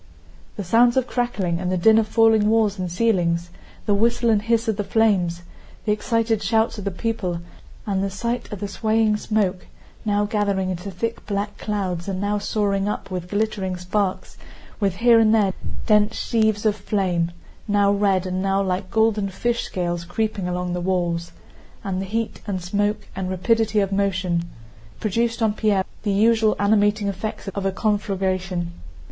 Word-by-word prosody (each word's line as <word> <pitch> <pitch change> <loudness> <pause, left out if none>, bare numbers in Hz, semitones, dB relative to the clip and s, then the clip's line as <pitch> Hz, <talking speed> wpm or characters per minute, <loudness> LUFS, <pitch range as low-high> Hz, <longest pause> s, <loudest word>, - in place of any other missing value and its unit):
The 205 - -4
sounds 235 +6 +4
of 260 - +3
crackling 215 -9 -1
and 180 0 -2
the 185 - +1
din 220 +5 +5
of 220 - 0
falling 220 -1 +4
walls 215 -3 +2
and 180 -2 -3
ceilings, 175 -4 +1 0.3
the 205 - +2
whistle 235 +3 +2
and 210 -2 +3
hiss 230 +1 +1
of 220 -3 0
the 205 - -1
flames, 190 -6 +1 0.4
the 210 - +2
excited 225 0 0
shouts 220 +2 +1
of 205 - -7
the - - +1
people, 190 -3 -2 0.5
and 195 -2 0
the 195 - -1
sight 235 +6 -3
of 205 -2 -6
the 205 - -2
swaying 215 +1 +1
smoke, 200 -4 -1 0.4
now 205 -1 +1
gathering 200 -3 0
into 180 +2 -5
thick 225 +5 -4
black 205 0 -3
clouds 190 -5 -3
and 190 -1 -2
now 205 +1 0
soaring 200 -1 0
up 210 - -5
with 180 -1 -4
glittering 205 -3 -1
sparks, 185 +2 -2 0.4
with 195 -4 +1
here 230 +3 +5
and 220 0 +5
there 200 -4 +2 0.3
dense 210 0 +3
sheaves 220 -2 +1
of 210 -1 +3
flame 185 -5 -1 0.4
(now 205 -1 +3
red 200 -2 +2
and 185 0 -2
now 195 0 +1
like 190 0 -1
golden 215 -1 +2
fish 235 +5 -1
scales 175 -2 -2
creeping 200 +1 -2
along 180 0 -2
the 180 - -2
walls), 175 -2 -1 0.5
and 190 -1 -2
the 195 - -5
heat 225 +3 -3
and 195 -2 -2
smoke 205 +3 -1
and 185 -1 -3
rapidity 220 +3 +1
of 195 -1 0
motion, 185 -3 0 0.5
produced 230 +3 0
on 215 -1 +2
Pierre 210 -3 +1 0.2
the 205 - -1
usual 220 +2 +3
animating 205 0 +2
effects 200 +1 -4
of 195 0 -2
a - - +1
conflagration. 190 -4 -1
205 Hz, 175 wpm, -22 LUFS, 185-220 Hz, 0.5 s, din